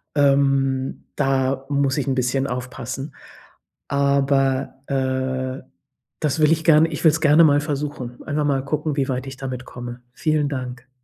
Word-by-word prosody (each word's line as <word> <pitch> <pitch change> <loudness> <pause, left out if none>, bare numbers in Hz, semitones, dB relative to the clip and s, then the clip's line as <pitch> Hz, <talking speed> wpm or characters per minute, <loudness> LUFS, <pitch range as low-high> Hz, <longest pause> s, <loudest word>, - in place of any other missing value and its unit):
Ähm, 135 -2 +2
da 135 0 0
muss 140 -1 +1
ich 140 - -1
'n 135 - +1
bisschen 130 +1 0
aufpassen. 125 +2 -5 0.7
Aber, 140 -1 +1
äh, 130 -1 -2 0.6
das 150 0 0
will 155 0 +5
ich 160 0 +1
gerne 160 0 +5
ich 155 - -5
will 160 - +8
es 160 - -2
gerne 155 +2 +6
mal 145 -2 +5
versuchen. 145 -5 -4
Einfach 150 0 -1
mal 135 -2 +1
gucken, 150 0 -1
wie 135 -1 0
weit 125 +1 -2
ich 135 -1 -8
damit 130 -2 -5
komme. 120 0 -8
Vielen 155 0 +1
Dank. 125 -2 -6
135 Hz, 160 wpm, -22 LUFS, 130-145 Hz, 0.7 s, will